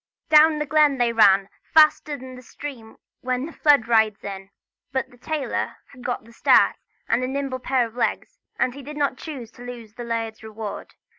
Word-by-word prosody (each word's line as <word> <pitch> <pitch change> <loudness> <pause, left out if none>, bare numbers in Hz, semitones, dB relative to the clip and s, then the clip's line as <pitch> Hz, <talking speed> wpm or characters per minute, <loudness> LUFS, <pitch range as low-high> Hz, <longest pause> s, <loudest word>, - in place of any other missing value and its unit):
Down 310 0 +6
the 300 - -2
glen 300 -2 +3
they 240 -2 +1
ran, 200 -3 +5 0.3
faster 305 -1 +5
than 260 -1 -10
the 250 - -11
stream 240 -2 -9 0.2
when 255 +1 -2
the 330 - -9
flood 285 -7 +4
rides 220 -3 +2
it; 195 -1 -7 0.4
but 265 -2 -2
the 245 - -18
tailor 300 +1 -3 0.2
had 250 - -14
got 245 -2 -3
the 230 - -17
start - - +4 0.3
and 235 +2 +1
a - - 0
nimble 270 -1 -3
pair 255 -1 +1
of 225 - -10
legs, - - -2 0.2
and 250 - +1
he 280 - -9
did 295 +2 -9
not 280 -2 0
choose 260 -8 -8
to 240 - -16
lose 235 -3 -9
the 240 - -8
laird's 225 -1 -3
reward. 220 -1 -7
250 Hz, 200 wpm, -23 LUFS, 225-285 Hz, 0.4 s, Down